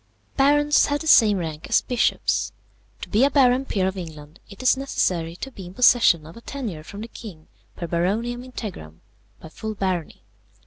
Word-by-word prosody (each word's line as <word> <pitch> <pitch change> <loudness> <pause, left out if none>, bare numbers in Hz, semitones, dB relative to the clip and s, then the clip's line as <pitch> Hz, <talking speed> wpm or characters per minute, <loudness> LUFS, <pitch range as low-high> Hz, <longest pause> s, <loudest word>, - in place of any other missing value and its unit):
"Barons 290 +1 +4
have 290 0 -1
the - - -7
same 220 -9 +6
rank 160 -2 -5
as - - +4
bishops. 245 -2 0 0.5
To - - -7
be 220 +4 +3
a 280 - +5
baron 265 -2 +3
peer 190 -7 0
of 190 0 -3
England, 155 -2 -10
it 200 - -10
is 255 - +5
necessary 175 -11 -1
to 270 +9 -7
be 190 -7 -10
in 180 - -12
possession 230 -10 +5
of 160 - -12
a 230 - -12
tenure 230 - -6
from 200 +6 -9
the 225 - -6
king 190 -9 -11 0.3
per 175 - -5
Baroniam 205 +9 -1
integram, 190 - -8 0.4
by 160 - -11
full 215 +7 -6
barony. 185 - -3
205 Hz, 185 wpm, -23 LUFS, 170-250 Hz, 0.5 s, same